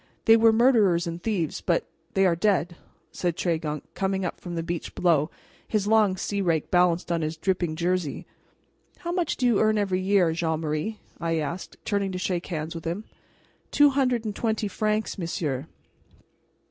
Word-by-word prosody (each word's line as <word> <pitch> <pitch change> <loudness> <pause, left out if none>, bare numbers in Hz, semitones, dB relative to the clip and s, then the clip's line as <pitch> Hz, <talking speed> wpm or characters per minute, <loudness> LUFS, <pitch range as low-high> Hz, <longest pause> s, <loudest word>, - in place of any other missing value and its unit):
"They 225 - +8
were 225 0 +6
murderers 220 -7 +4
and 170 0 -5
thieves, 185 -8 -1
but 170 -2 +1 0.3
they 195 0 +4
are 175 -2 +3
dead," 175 -2 +1 0.4
said 175 -2 -2
Tregunc, 160 -4 -1
coming 190 -1 -1
up 175 - -5
from 175 -1 -6
the 165 - -2
beach 170 0 -4
below, 160 -4 +2 0.4
his 210 -2 0
long 210 -3 +4
sea 200 +2 -2
rake 165 -5 0
balanced 175 -1 +2
on 170 -1 +1
his 155 +1 -3
dripping 175 -2 -1
jersey. 175 -2 -1 0.7
"How 345 - -4
much 350 -3 -1
do 255 - 0
you 235 -5 +4
earn 215 0 +3
every 195 -3 +1
year, 185 -4 +3
Jean 160 -1 -1
Marie?" 155 +8 -2 0.2
I 165 -1 0
asked, 160 +4 -4
turning 200 -2 0
to - - -2
shake 180 -1 -2
hands 160 -2 -4
with 165 -1 -8
him. 175 +6 -3 0.7
"Two 290 -1 +5
hundred 255 -4 +1
and 210 -2 -3
twenty 220 -2 -1
francs, 215 +1 -1
monsieur." 155 -5 -2
180 Hz, 175 wpm, -26 LUFS, 165-215 Hz, 0.7 s, They